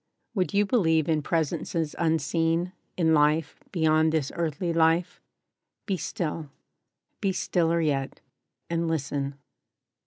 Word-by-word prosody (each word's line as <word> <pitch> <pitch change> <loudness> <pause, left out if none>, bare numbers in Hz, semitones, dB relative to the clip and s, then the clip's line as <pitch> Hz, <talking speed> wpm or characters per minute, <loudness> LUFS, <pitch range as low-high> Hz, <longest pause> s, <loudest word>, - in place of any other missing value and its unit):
WOULD 195 -1 -1
you 205 +1 +4
believe 160 - +2
in 155 -2 +2
Presences 160 0 -1
Unseen— 165 +2 +1 0.2
In 160 -3 +3
life 150 0 +2
beyond 160 -2 +3
this 155 -4 0
earthly 170 +1 -1
life? 165 +1 +2 0.6
BE 195 - 0
STILL: 160 -3 -3 0.7
Be 195 -2 +1
stiller 170 -2 +1
yet; 140 -4 -1 0.5
and 170 0 -1
listen. 140 -3 -2
160 Hz, 115 wpm, -27 LUFS, 155-170 Hz, 0.7 s, you